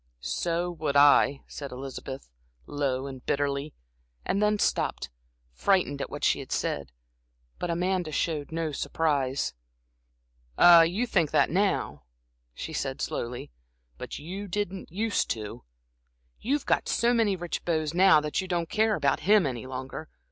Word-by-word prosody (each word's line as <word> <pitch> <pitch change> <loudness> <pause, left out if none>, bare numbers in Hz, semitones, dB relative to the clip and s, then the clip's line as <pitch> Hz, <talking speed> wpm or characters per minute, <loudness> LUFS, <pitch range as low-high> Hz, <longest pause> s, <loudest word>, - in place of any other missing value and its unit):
"So 170 - -1
would 155 -4 -3
I," 140 -1 +5
said 140 -2 -8
Elizabeth, 135 +1 -7 0.4
low 135 -2 -2
and 130 -2 -8
bitterly, 140 +1 -1 0.5
and 200 - 0
then 210 0 +3
stopped, 65 - -1 0.4
frightened 145 - +1
at - - -4
what - - -7
she - - +3
had - - -9
said. 70 -3 -2 0.7
But 175 - -3
Amanda 180 -1 -1
showed 150 -2 -2
no 165 -1 -2
surprise. 140 - -1 1.0
"Ah, 170 -1 +9
you 180 +9 +1
think 165 -10 +1
that - - +2
now," 175 - 0 0.5
she 160 - -6
said, 135 -1 -3
slowly, 120 - -4 0.5
"but - - -6
you 190 +7 -6
didn't 195 -2 -4
use 215 +4 0
to. 110 +1 -5 0.7
You've 280 +5 -1
got - - +1
so 240 +1 +2
many 220 -4 +2
rich 175 -2 -4
beaux 160 -2 0
now 185 -2 +6
that 150 +5 -1
you 190 - -6
don't 175 -2 -1
care 215 0 +2
about 140 -5 +1
him 205 -2 +4
any 130 -2 -4
longer. 130 +4 -6
160 Hz, 150 wpm, -27 LUFS, 140-185 Hz, 1.0 s, Ah